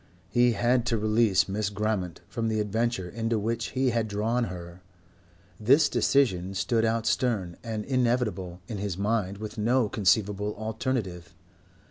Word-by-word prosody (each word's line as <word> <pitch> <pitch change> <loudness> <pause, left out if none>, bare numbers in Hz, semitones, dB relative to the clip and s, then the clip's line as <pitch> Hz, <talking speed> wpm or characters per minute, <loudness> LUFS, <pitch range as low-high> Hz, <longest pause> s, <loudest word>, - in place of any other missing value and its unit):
He 120 +1 +4
had 120 +3 +2
to 115 - +1
release 110 -1 +3
Miss 100 +1 -1
Grammont 100 -5 -2
from 115 -2 -3
the 110 -1 0
adventure 105 -2 -1
into 115 +4 -1
which 115 +3 -1
he 130 -1 +3
had 115 -1 0
drawn 110 +4 0
her. 90 -1 -8 0.8
This 140 +8 +5
decision 95 -9 +1
stood 110 +4 +1
out 115 0 +1
stern 100 -9 0
and 110 -3 -4
inevitable 120 -9 0
in 105 - -5
his 100 -3 -3
mind 100 -1 -1
with 110 +1 -7
no 120 +1 +2
conceivable 105 0 +1
alternative. 110 -5 -3
110 Hz, 145 wpm, -27 LUFS, 100-115 Hz, 0.8 s, This